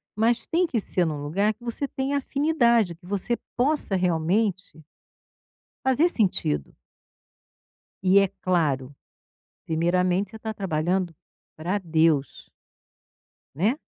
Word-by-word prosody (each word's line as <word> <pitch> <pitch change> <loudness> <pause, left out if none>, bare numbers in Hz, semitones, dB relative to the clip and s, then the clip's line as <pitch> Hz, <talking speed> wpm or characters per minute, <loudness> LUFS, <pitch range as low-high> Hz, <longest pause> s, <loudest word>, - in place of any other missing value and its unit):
mas 230 +3 +1
tem 345 +1 +2
que 240 - -1
ser 180 -3 0
no 150 -2 -3
lugar 200 +8 +1
que 240 +3 -21
você 240 +4 -3
tenha 270 +2 -2
afinidade, 240 - +2
que 175 - -21
você 205 +5 +1 0.2
possa 260 -5 +1
realmente 180 +1 0 1.0
fazer 290 +7 +3
sentido. 125 - 0 1.3
E 200 +1 +7
é 195 - +3
claro, 145 -7 0 0.7
primeiramente 180 +4 +1
você 220 - -9
tá 220 0 -4
trabalhando 180 -2 -1 0.4
para 180 +6 -1
Deus. 160 -6 +1 1.1
Né. 205 - +2
195 Hz, 110 wpm, -25 LUFS, 165-235 Hz, 1.3 s, E